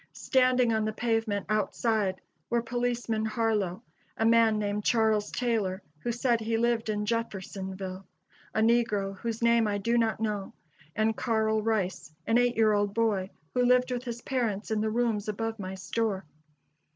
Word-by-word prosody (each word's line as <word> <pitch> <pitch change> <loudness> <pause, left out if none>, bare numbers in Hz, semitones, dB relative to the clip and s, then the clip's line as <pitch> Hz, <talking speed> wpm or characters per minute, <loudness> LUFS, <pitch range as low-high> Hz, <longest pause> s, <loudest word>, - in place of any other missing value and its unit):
Standing 255 -3 +3
on 220 0 +1
the 215 0 -1
pavement 225 -3 0
outside 215 -2 0 0.3
were 235 -1 +1
policeman 240 -2 -1
Harlow, 215 -3 0 0.3
a 225 - +1
man 225 -1 +5
named 205 0 -1
Charles 220 -2 +2
Taylor, 210 -6 -1 0.2
who 235 - -2
said 240 0 +1
he 225 +1 0
lived 235 -1 +1
in 210 -1 -1
Jeffersonville, 190 -4 -4 0.5
a 220 - +2
negro 220 -4 +2
whose 230 0 -3
name 235 -1 +4
I 205 -1 0
do 230 +4 +1
not 225 -2 +1
know, 210 -3 -2 0.4
and 220 +1 +1
Carl 220 -2 +1
Rice, 195 -7 -2
an 225 +2 +3
eight 245 -1 +2
year 220 -1 +4
old 205 -1 0
boy 210 -5 +1 0.2
who 250 - +2
lived 250 +1 +4
with 250 0 -2
his 240 -1 -5
parents 225 -6 -2
in 215 -1 +1
the 220 - 0
rooms 225 -2 0
above 225 +1 -3
my 190 -1 -5
store. 195 0 -2
220 Hz, 165 wpm, -28 LUFS, 205-235 Hz, 0.5 s, man